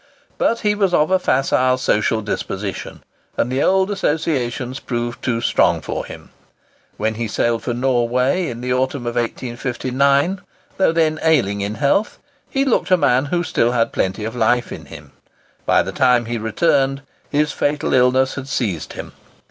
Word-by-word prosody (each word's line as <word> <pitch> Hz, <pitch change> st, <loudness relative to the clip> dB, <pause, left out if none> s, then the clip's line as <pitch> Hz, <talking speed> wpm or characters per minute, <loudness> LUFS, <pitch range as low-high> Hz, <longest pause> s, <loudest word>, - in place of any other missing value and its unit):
But 230 Hz, -, +1 dB
he 210 Hz, -1 st, +2 dB
was 195 Hz, -4 st, +1 dB
of 155 Hz, +4 st, +2 dB
a 190 Hz, -, +4 dB
facile, 130 Hz, -4 st, +2 dB
social 110 Hz, -3 st, +1 dB
disposition, 100 Hz, -1 st, -5 dB, 0.3 s
and 120 Hz, -, 0 dB
the 130 Hz, +2 st, 0 dB
old 190 Hz, +3 st, +2 dB
associations 140 Hz, -8 st, -1 dB
proved 120 Hz, -1 st, -4 dB
too 115 Hz, -2 st, 0 dB
strong -, -, +2 dB
for -, -, -5 dB
him. -, -, -11 dB, 0.7 s
When 110 Hz, +1 st, 0 dB
he 115 Hz, +1 st, -3 dB
sailed 115 Hz, +2 st, 0 dB
for 120 Hz, -, -3 dB
Norway, 125 Hz, +6 st, +1 dB
in 120 Hz, 0 st, -6 dB
the 125 Hz, 0 st, -1 dB
autumn 130 Hz, 0 st, -1 dB
of 120 Hz, -, -2 dB
1859, 130 Hz, -, 0 dB, 0.4 s
though 190 Hz, -, +3 dB
then 160 Hz, -1 st, +1 dB
ailing 120 Hz, -11 st, +2 dB
in 100 Hz, +2 st, -3 dB
health, 150 Hz, -, +1 dB, 0.3 s
he 275 Hz, 0 st, 0 dB
looked 260 Hz, -, +1 dB
a 185 Hz, -, +5 dB
man 135 Hz, -4 st, +2 dB
who 160 Hz, +5 st, -1 dB
had -, -, -4 dB
still 120 Hz, -5 st, +2 dB
plenty 95 Hz, +3 st, -1 dB
of 110 Hz, +2 st, -5 dB
life 120 Hz, +1 st, +1 dB
in -, -, -8 dB
him. -, -, -12 dB, 0.6 s
By -, -, +4 dB
the -, -, -5 dB
time 125 Hz, -2 st, +3 dB
he 120 Hz, 0 st, -3 dB
returned, 135 Hz, +4 st, +1 dB, 0.3 s
his 150 Hz, 0 st, +1 dB
fatal 145 Hz, +1 st, -1 dB
illness 130 Hz, +1 st, +3 dB
had 130 Hz, -1 st, -6 dB
seized 105 Hz, -, -2 dB
him. -, -, -8 dB
130 Hz, 170 wpm, -20 LUFS, 120-150 Hz, 0.7 s, a